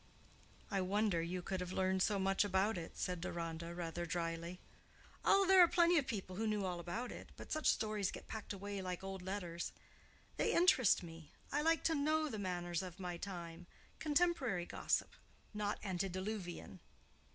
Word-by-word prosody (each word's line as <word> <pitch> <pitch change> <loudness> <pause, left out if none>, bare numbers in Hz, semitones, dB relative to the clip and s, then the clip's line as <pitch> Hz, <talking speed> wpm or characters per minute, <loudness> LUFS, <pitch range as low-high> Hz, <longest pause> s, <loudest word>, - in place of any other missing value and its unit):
"I 195 -1 +1
wonder 195 -1 +2
you 175 +2 -3
could 190 0 -2
have 180 0 -4
learned 190 0 +1
so 205 +2 +3
much 195 +1 +3
about 200 +2 +2
it," 170 -2 -6
said 180 -2 -2
Deronda, 170 0 -4
rather 170 0 -3
drily. 170 +1 -3 0.6
"Oh, 395 0 +5
there 380 0 +8
are 350 - +9
plenty 340 0 +5
of 275 - -3
people 190 -6 -4
who 220 +1 0
knew 210 -2 0
all 180 -2 -2
about 220 +9 -4
it; - - -9
but - - -10
such 310 0 +1
stories 215 -3 +1
get - - -8
packed 220 -1 -6
away 200 0 -4
like 185 0 -4
old 195 -1 -5
letters. 180 -3 -3 0.7
They - - +2
interest 265 - +5
me. 165 -2 -10 0.2
I 290 - +2
like 325 +1 +3
to 325 - +3
know 310 +1 +2
the 215 - -4
manners 175 -2 -1
of 180 -1 -8
my 180 -2 -3
time—contemporary 195 - -1
gossip, - - 0 0.4
not 210 0 -1
antediluvian. 185 - -3
190 Hz, 170 wpm, -37 LUFS, 175-220 Hz, 0.7 s, are